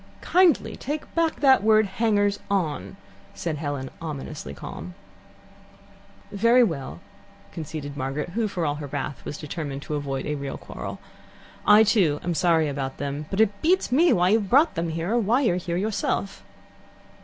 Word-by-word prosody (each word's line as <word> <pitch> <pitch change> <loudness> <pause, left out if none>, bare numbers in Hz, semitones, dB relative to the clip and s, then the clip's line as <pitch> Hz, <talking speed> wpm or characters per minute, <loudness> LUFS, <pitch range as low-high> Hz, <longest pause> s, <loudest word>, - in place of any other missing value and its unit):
'" - - -26
"Kindly 360 -4 +3
take 295 +3 -5
back 330 -1 0
that 265 -5 +6
word 215 0 +5
'hangers 205 0 +1
on,'" 155 - -2 0.4
said 165 -3 -3
Helen, 145 -3 -4
ominously 150 - -6
calm. 80 +5 -8 1.4
"Very 230 +5 +4
well," 160 - -3 0.5
conceded 150 -3 -6
Margaret, 140 +4 -3
who 220 +5 -1
for 180 -4 -2
all 145 - +1
her 145 - -5
wrath 140 0 -5
was 150 - -5
determined 145 -2 -5
to - - -5
avoid 140 -2 -3
a 150 - -2
real 140 -2 -5
quarrel. - - -7 0.7
"I, 210 +1 +8
too, 185 -9 +2
am 175 - -1
sorry 165 -1 +3
about 135 -2 -4
them, 145 +1 -4
but 195 - -3
it 205 -2 +2
beats 360 -3 +2
me 320 +6 +5
why 180 -5 +3
you've 210 -2 +2
brought 295 +5 +5
them 165 0 -2
here, 165 +4 -3
or 240 - +3
why 230 +5 +2
you're 205 -10 +2
here 175 -1 -3
yourself. 200 0 -2
175 Hz, 165 wpm, -25 LUFS, 145-220 Hz, 1.4 s, I